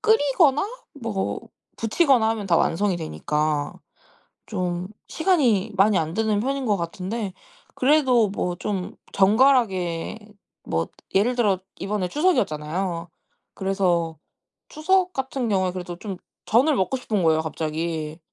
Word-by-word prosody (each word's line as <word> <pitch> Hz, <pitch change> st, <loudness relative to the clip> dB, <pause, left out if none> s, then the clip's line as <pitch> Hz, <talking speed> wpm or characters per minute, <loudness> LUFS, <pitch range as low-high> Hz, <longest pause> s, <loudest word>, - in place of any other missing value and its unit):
끓이거나 295 Hz, -7 st, +3 dB, 0.3 s
뭐 215 Hz, -5 st, -2 dB, 0.4 s
부치거나 235 Hz, 0 st, +3 dB
하면 220 Hz, -3 st, -3 dB
다 170 Hz, -3 st, +3 dB
완성이 190 Hz, +3 st, +1 dB
되니까 150 Hz, -, -1 dB, 0.7 s
좀 180 Hz, -3 st, -3 dB, 0.2 s
시간이 250 Hz, -, +2 dB
많이 200 Hz, 0 st, +4 dB
안 160 Hz, 0 st, -2 dB
드는 215 Hz, -1 st, +1 dB
편인 270 Hz, +3 st, -2 dB
것 210 Hz, -2 st, +2 dB
같은데. 190 Hz, +4 st, -4 dB, 0.4 s
그래도 260 Hz, -5 st, +4 dB
뭐 180 Hz, -2 st, -2 dB
좀 190 Hz, -1 st, -3 dB, 0.2 s
정갈하게 195 Hz, -5 st, +3 dB, 0.5 s
뭐 80 Hz, 0 st, -1 dB, 0.3 s
예를 215 Hz, +6 st, +3 dB
들어 210 Hz, -6 st, +2 dB, 0.2 s
이번에 195 Hz, -1 st, -2 dB
추석이었잖아요. 175 Hz, -, 0 dB, 0.5 s
그래서 180 Hz, -4 st, 0 dB, 0.5 s
추석 365 Hz, +4 st, +1 dB
같은 265 Hz, -2 st, -2 dB
경우에 190 Hz, -3 st, +1 dB
그래도 180 Hz, -1 st, -6 dB
좀 195 Hz, -1 st, -6 dB, 0.3 s
전을 265 Hz, +8 st, +4 dB
먹고 190 Hz, +6 st, 0 dB
싶은 215 Hz, -6 st, -1 dB
거예요 160 Hz, -1 st, +3 dB
갑자기. 160 Hz, 0 st, -3 dB
195 Hz, 270 characters per minute, -24 LUFS, 175-250 Hz, 0.7 s, 많이